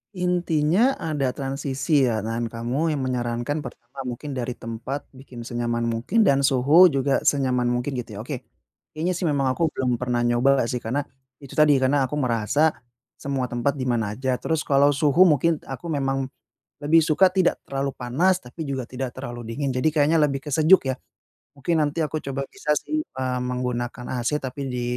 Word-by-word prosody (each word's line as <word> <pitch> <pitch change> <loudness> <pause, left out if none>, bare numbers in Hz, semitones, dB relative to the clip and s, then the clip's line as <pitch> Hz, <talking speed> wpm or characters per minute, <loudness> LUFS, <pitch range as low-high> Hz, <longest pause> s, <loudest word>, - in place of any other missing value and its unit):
Intinya 180 - +2
ada 145 -5 -2
transisi 135 +1 0
ya 110 -3 -1
dan 115 +1 -2
kamu 125 +8 -1
yang 140 - -3
menyarankan 120 +2 -2
pertama 125 -1 -10
mungkin 125 +4 -5
dari 125 -2 -3
tempat 120 +5 -5
bikin 130 -3 -11
senyaman 120 -1 -2
mungkin 115 - +1
dan 140 -7 +4
suhu 145 +7 +6
juga 140 -3 +1
senyaman 130 -4 +2
mungkin 125 +3 -1
gitu 125 -5 -5
ya, - - -7
oke. 130 +1 -5 0.6
Kayaknya 170 +4 0
sih 175 0 -2
memang 140 -3 +1
aku 165 +6 +1
belum 125 -2 0
pernah 125 -1 0
nyoba 120 +3 +3
nggak 115 - -3
sih 125 - -2
karena, 125 +5 -2 0.4
itu 140 - -11
tadi 150 -1 +6
karena 135 +1 +2
aku 150 - -4
merasa 130 +4 +2 0.5
semua 135 -2 -2
tempat 120 +4 0
di 135 - -4
mana 115 -4 -1
aja, 130 0 -1
terus 160 +1 -1
kalau 140 0 +4
suhu 145 +4 +3
mungkin 160 +1 +2
aku 135 +4 -7
memang 135 -2 0 0.6
lebih 155 +3 +5
suka 160 +4 +4
tidak 185 -1 +1
terlalu 140 0 -2
panas, 170 +10 +1
tapi 150 +6 -7
juga 135 -2 -3
tidak 130 -1 -4
terlalu 120 -3 -7
dingin, 135 +4 -2
jadi 125 +4 0
kayaknya 155 +2 +3
lebih 140 -3 +1
ke 150 - -6
sejuk 160 +6 +6
ya. - - -1 0.6
Mungkin 160 +4 +1
nanti 150 +2 -1
aku 155 0 -4
coba 135 0 -4
bisa 160 -7 -3
sih, 310 - -2
eee, 130 - -3
menggunakan 125 -1 -3 0.2
AC 150 +5 0
tapi 135 0 -6
di 125 -1 -3
135 Hz, 185 wpm, -24 LUFS, 125-150 Hz, 0.6 s, suhu